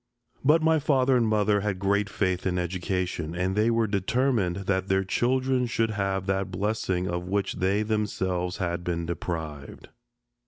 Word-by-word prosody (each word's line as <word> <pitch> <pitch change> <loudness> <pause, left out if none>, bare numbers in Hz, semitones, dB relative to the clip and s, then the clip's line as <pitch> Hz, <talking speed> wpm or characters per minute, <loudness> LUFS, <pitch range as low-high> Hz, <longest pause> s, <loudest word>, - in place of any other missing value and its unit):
But 155 +4 +4
my 160 0 +4
father 135 -3 +3
and 120 -2 +3
mother 105 -1 +2
had 100 -2 -2
great 100 +1 +1
faith 95 -2 -1
in 90 -1 0
education, 90 -2 -2
and 90 +2 -1
they 110 +2 +3
were 115 -1 +2
determined 105 -1 +1
that 95 0 0
their 95 0 +2
children 130 +5 +1
should 115 -1 0
have 95 -2 -1
that 95 -1 -1
blessing 95 -2 -1
of 90 0 -3
which 100 0 -1
they 100 +3 +1
themselves 95 -4 -1
had 85 -2 -2
been 85 -1 -2
deprived. 80 -4 -5
95 Hz, 160 wpm, -26 LUFS, 90-110 Hz, -, But